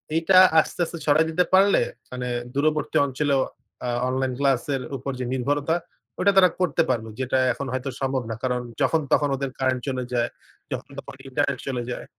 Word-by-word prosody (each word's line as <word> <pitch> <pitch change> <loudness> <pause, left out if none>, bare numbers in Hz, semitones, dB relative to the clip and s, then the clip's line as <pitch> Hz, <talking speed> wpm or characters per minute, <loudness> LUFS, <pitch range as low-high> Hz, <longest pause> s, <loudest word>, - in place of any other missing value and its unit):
এইটা 165 +3 +4 0.2
আস্তে 155 - -1
আস্তে 170 - -7
ছড়ায় 155 +2 +4
দিতে 170 +3 +2
পারলে 195 +2 +5 0.3
মানে 125 0 -4 0.3
দূরবর্তী 150 +1 +1
অঞ্চলেও 140 0 +1 0.4
আ - - -1 0.2
অনলাইন 130 0 -1
ক্লাস 135 -3 +2
এর 135 - -3 0.2
উপর 135 +2 -4
যে 125 - -2
নির্ভরতাটা 145 +5 0 0.6
তারা 185 -1 +7
করতে 180 -6 +2
পারবে। 115 -3 -1
যেটা 130 0 0 0.2
এখন 140 - -5
হয়তো 130 +1 -2
সম্ভব 135 -1 0
না। - - -2
কারণ 125 -1 0 0.2
যখন 160 - +3
তখন 145 - +3
ওদের 135 0 -3
কারেন্ট 130 -1 +1
চলে 130 -2 -1
যায়, 120 -1 +1 0.4
যখন - - -5
তখন - - -9
ইন্টারনেট 140 0 -1
চলে 125 -3 -2
যায়। - - -5
135 Hz, 175 wpm, -24 LUFS, 130-150 Hz, 0.6 s, তারা